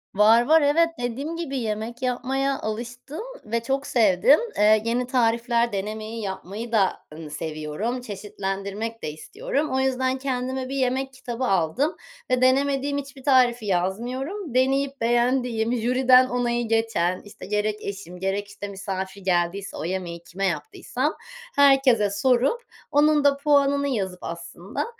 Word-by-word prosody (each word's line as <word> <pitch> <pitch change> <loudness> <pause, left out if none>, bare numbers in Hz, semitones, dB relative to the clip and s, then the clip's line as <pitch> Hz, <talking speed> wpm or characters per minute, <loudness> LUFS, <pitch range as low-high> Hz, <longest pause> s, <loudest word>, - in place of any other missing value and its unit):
Var, 220 +3 +6
var, 320 +3 +5
evet. 310 +4 +4
Dediğim 260 +7 -3
gibi 320 -5 -4
yemek 225 +1 -4
yapmaya 265 +2 -1
alıştım 240 - -5 0.2
ve 230 +1 -2
çok 270 +3 -1
sevdim. 225 +4 +5 0.2
Eee, 215 +1 +5
yeni 240 +2 0
tarifler 235 -1 +2
denemeyi, 215 +3 -4
yapmayı 205 +3 -5
da, 205 -5 +2
ııı, 155 0 -8
seviyorum, 155 +10 -4
çeşitlendirmek 205 +1 -5
de 150 - -2
istiyorum. 310 - -3
O 260 - +1
yüzden 260 0 +1
kendime 260 -1 -3
bir 275 - -4
yemek 265 0 0
kitabı 250 -1 -5
aldım 195 - +1 0.4
ve 255 0 +2
denemediğim 275 +2 +2
hiçbir 275 -1 -7
tarifi 250 -4 +4
yazmıyorum. 245 - -2
Deneyip 270 +1 +1
beğendiğim, 240 -1 +1
jüriden 255 +2 +5
onayı 240 -1 0
geçen, 225 -6 +1
işte, 205 - -11
gerek 210 +1 0
eşim, 195 -3 -7
gerek, 195 +2 -2
işte, 205 0 -7
misafir 195 0 -5
geldiyse 185 +1 -1
o - - -4
yemeği 170 -1 -4
kime 190 +3 -4
yaptıysam 190 - -2 0.4
herkese 270 -6 +5
sorup 255 - +2 0.3
onun 295 0 +4
da 285 -1 +4
puanını 280 -1 +3
yazıp 190 -8 -2
aslında, 170 +4 -5
235 Hz, 135 wpm, -24 LUFS, 200-265 Hz, 0.4 s, Var